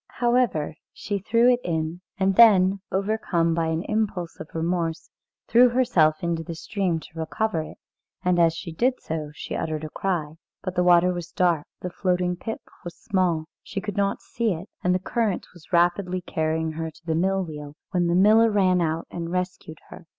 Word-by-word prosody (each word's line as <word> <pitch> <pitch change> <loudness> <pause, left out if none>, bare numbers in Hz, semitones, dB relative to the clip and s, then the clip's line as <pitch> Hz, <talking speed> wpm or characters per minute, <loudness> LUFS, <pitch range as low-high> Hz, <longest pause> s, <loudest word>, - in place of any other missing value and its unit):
However, 240 -10 +1 0.2
she 205 -1 -4
threw 230 +5 +3
it 245 - 0
in, 160 +1 -2 0.2
and 190 0 +2
then, 195 -4 +6
overcome 190 -4 0
by 165 0 0
an 160 +1 -1
impulse 205 -6 -2
of - - -8
remorse, 165 0 -2 0.4
threw 245 +2 +6
herself 185 -12 +2
into 170 -1 -1
the 165 +1 -6
stream 180 -1 -1
to 160 +1 -12
recover 180 +2 -1
it, 155 - -9 0.5
and 180 -1 +3
as 165 -1 +4
she 170 0 -6
did 250 +10 +1
so 155 -2 -4
she - - -6
uttered 155 -1 -3
a 155 - -6
cry. 165 -5 -2 0.3
But 185 - -3
the 180 - +1
water 180 0 +5
was 175 -1 -6
dark, 170 -5 +1
the 180 - -4
floating 180 -1 0
pip 225 +5 -6 0.2
was 175 -2 -8
small, 180 -6 0 0.2
she - - -5
could 205 0 -5
not 200 0 0
see 230 -4 -1
it, 175 +7 -9
and 180 0 +3
the - - +1
current 210 0 -1
was 175 -3 -18
rapidly 180 +1 +2
carrying 160 -1 -1
her 160 +1 -4
to 165 +1 -19
the 165 - 0
mill 190 +4 +1
wheel, 150 -3 -8 0.2
when 175 -2 +1
the 170 - +2
miller 215 +4 +6
ran 185 -4 +3
out 160 0 -1
and 170 -1 -5
rescued 180 -3 -4
her. 165 - -12
180 Hz, 190 wpm, -25 LUFS, 165-195 Hz, 0.5 s, then